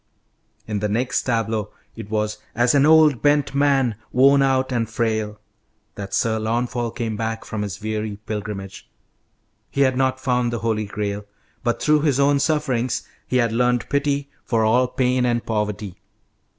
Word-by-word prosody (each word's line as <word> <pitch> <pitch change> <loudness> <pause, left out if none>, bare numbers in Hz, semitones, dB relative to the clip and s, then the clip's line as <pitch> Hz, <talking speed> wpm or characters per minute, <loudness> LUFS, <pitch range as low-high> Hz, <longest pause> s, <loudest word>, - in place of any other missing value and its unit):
In 105 -2 -2
the 105 +1 -1
next 125 +4 0
tableau 110 -3 -1 0.3
it 110 -2 -8
was 105 0 -1 0.2
"as 120 +2 +3
an 140 0 +4
old 155 -6 +5
bent 145 -2 +2
man, 140 -4 +2 0.2
worn 140 +2 +5
out 130 -1 +2
and 115 -3 -1
frail," 110 -2 -1 0.5
that 100 -1 -7
Sir 110 -1 +1
Launfal 120 +2 -1
came 115 -2 -3
back 110 +1 -3
from 110 - -4
his 100 -2 -4
weary 110 -1 -3
pilgrimage. 105 -2 -6 0.8
He 140 - -1
had 130 -2 +3
not 130 0 +1
found 125 -3 0
the 120 - -2
Holy 110 -1 0
Grail, 100 0 -4 0.4
but 120 -1 0
through 150 -1 +3
his 145 -3 +1
own 140 0 +4
sufferings 135 -5 0 0.2
he 130 - +1
had 120 -3 +2
learned 125 +1 +1
pity 140 -1 0
for 115 -2 +1
all 125 +3 +3
pain 125 0 +1
and 120 -1 0
poverty. 105 -3 -3
120 Hz, 165 wpm, -22 LUFS, 110-135 Hz, 0.8 s, old